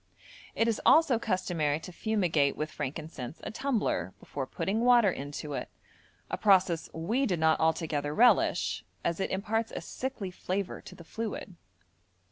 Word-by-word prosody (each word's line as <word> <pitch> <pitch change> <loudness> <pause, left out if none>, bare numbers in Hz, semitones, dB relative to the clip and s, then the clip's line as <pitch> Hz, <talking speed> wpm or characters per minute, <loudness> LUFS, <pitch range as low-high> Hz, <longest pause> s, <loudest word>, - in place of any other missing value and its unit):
It 225 - +2
is 225 -2 0
also 295 -7 +5
customary 175 -8 0
to 180 - -8
fumigate 175 -8 +1
with 155 0 -3
frankincense 145 -1 -6
a - - -4
tumbler 220 - -1
before 135 -2 -5
putting 210 +10 -1
water 240 -5 +5
into 145 0 -6
it, - - -4 0.6
a - - -4
process 185 -5 +3
we 225 +12 0
did 180 -4 0
not 160 0 +3
altogether 160 -3 0
relish, 240 +10 +3 0.2
as 170 - 0
it 190 - -1
imparts 220 +4 -1
a - - -4
sickly 250 -8 -5
flavour 190 +1 -3
to - - -12
the 170 - -12
fluid. 215 +1 -5
185 Hz, 150 wpm, -30 LUFS, 155-225 Hz, 0.6 s, also